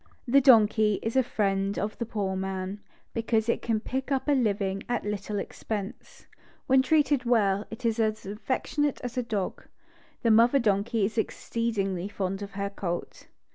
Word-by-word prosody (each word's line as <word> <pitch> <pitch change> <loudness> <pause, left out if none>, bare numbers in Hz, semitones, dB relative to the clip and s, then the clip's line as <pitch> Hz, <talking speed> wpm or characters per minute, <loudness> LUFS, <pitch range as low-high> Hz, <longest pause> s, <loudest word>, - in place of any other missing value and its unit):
The 275 +3 +5
donkey 215 -5 +5
is 225 +2 -2
a 265 - +6
friend 195 -4 -1
of 210 +1 -2
the 235 - -2
poor 200 -4 -2
man, 190 +1 -3 0.3
because 225 -1 0
it 235 - +1
can 225 -2 0
pick 265 +5 -4
up 270 +1 0
a - - +3
living 200 -7 +1
at 240 -3 -1
little 210 0 -3
expense. 200 0 -6 0.4
When 265 0 +5
treated 285 -1 +2
well, 210 -4 +2
it 225 +2 -8
is 230 0 +1
as 215 -1 0
affectionate 260 +7 -1
as 245 0 -5
a 250 - +1
dog. 210 -5 -3 0.6
The 230 - +4
mother 235 +5 +6
donkey 215 -1 +1
is 220 +3 -4
exccedingly 200 -6 -2
fond 195 -1 -3
of 200 -1 -7
her 200 0 -3
colt. 175 -3 -5
215 Hz, 170 wpm, -27 LUFS, 200-240 Hz, 0.6 s, a